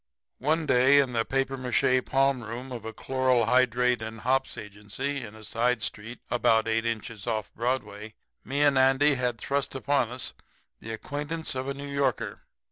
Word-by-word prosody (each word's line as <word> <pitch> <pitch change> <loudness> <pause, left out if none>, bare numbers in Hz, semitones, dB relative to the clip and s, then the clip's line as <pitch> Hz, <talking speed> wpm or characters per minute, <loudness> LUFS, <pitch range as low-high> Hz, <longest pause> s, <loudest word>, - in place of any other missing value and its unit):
"One 155 +5 +1
day 130 +1 +5
in 135 -3 +1
the 115 -1 +2
papier 135 +2 -1
mâché 130 0 +2
palm 135 -1 +2
room 120 +4 -7
of 115 -3 -6
a 115 - -4
chloral 130 -1 +1
hydrate 125 0 +3
and 110 0 -6
hops 135 -1 0
agency 105 +6 -5
in 110 -1 -9
a 110 - -12
side 115 +1 0
street 115 +4 -6
about 115 -2 +3
eight 115 +1 +1
inches 115 -1 -4
off 110 -2 -2
Broadway 110 -3 -3 0.3
me 140 +3 0
and 140 -2 +4
Andy 135 +3 +4
had 125 -2 -1
thrust 140 +2 -2
upon 135 -2 +1
us 125 +1 -4 0.5
the 115 - -7
acquaintance 150 +7 -3
of 130 0 -3
a 140 - -2
New 140 +1 -7
Yorker. 140 -4 -1
125 Hz, 175 wpm, -27 LUFS, 115-135 Hz, 0.5 s, day